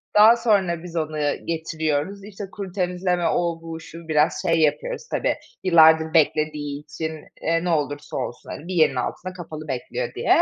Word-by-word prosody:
Daha 220 +3 +8
sonra 195 -8 +1
biz 170 -1 -9
onu 155 -1 -2 0.3
getiriyoruz. 160 +3 -2
İşte 205 0 -8
kuru 195 -3 -6
temizleme, 180 -1 0
o 170 -1 0
bu 165 0 -7
şu 165 0 -11
biraz 155 0 +2
şey 165 -3 +2
yapıyoruz 485 - 0
tabii - - +1 0.3
yıllardır 160 -2 +6
beklediği 150 -2 +1
için, 160 +2 -5 0.3
eee, 165 +1 +1
ne 180 - -1
olursa 145 -3 -1
olsun, 125 -2 -5
hani, 165 - -7
bir 185 - -4
yerin 155 -6 +4
altında 185 +8 -3
kapalı 155 -3 -8
bekliyor 130 -3 -3
diye. - - -4
165 Hz, 165 wpm, -23 LUFS, 155-180 Hz, 0.3 s, Daha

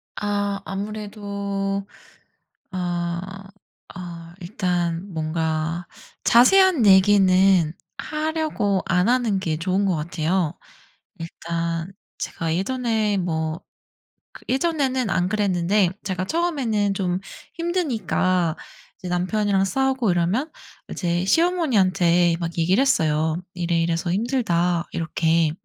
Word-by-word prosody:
아 205 -1 -2
아무래도 200 -1 -4 0.9
어 180 +2 -4 0.5
어 170 -2 -8
일단 175 0 -2
뭔가 160 +1 -2 0.4
자세한 310 - +5
얘기는 190 -3 +5 0.3
하려고 305 - -1
안 180 +2 +2
하는 240 -5 +2
게 160 -5 -2
좋은 185 +4 0
것 190 -3 +1
같아요. 165 +1 -1 0.6
일단 165 +1 -4 0.3
제가 165 -1 -3
예전에 220 -1 0
뭐 160 -2 -2 0.7
그 - - -15
예전에는 265 -3 0
안 180 0 +1
그랬는데 195 -1 +2 0.2
제가 185 -2 -2
처음에는 250 - 0
좀 185 -2 -1 0.4
힘드니까 215 - 0 0.4
이제 185 - -7
남편이랑 195 +2 +1
싸우고 260 +2 +1
이러면 195 - 0 0.4
이제 175 0 -1
시어머니한테 190 - +3
막 170 -1 -4
얘기를 180 +8 +2
했어요. 160 - +1
"이래이래서 170 -1 0
힘들다." 180 -7 0
이렇게. 165 0 +1
185 Hz, 225 characters per minute, -23 LUFS, 170-215 Hz, 0.9 s, 자세한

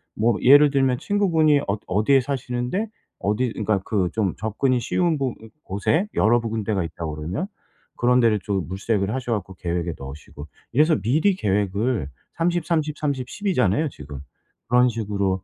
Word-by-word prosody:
뭐 115 0 +2
예를 145 +2 +7
들면 135 -3 +2
친구분이 165 -8 +3
어 100 - 0
어디에 110 +8 +3
사시는데 130 - -2 0.3
어디 105 +5 0
그러니까 105 -2 0
그 95 -5 0
좀 105 -5 0
접근이 120 +4 0
쉬운 170 +1 +1
부 135 -3 -2 0.3
곳에 150 - 0
여러 115 +4 +4
구 115 - -4
군데가 105 -4 -1
있다고 80 -1 -5
그러면 90 - -3 0.5
그런 125 +1 +4
데를 110 -2 +3
좀 95 -2 -2
물색을 100 +1 -1
하셔 125 -3 -2
갖고 95 -3 -4
계획에 85 -1 -2
넣으시고. 70 +2 -10 0.3
이래서 155 +4 +4
미리 155 - +2
계획을 100 - 0 0.3
30, 170 0 0
30, 155 -2 -1
30, 140 -4 -2
10 210 - -9
이잖아요 130 - +2
지금. 75 - -10 0.5
그런 125 +1 +5
식으로 100 -4 -2
115 Hz, 325 characters per minute, -23 LUFS, 100-140 Hz, 0.5 s, 예를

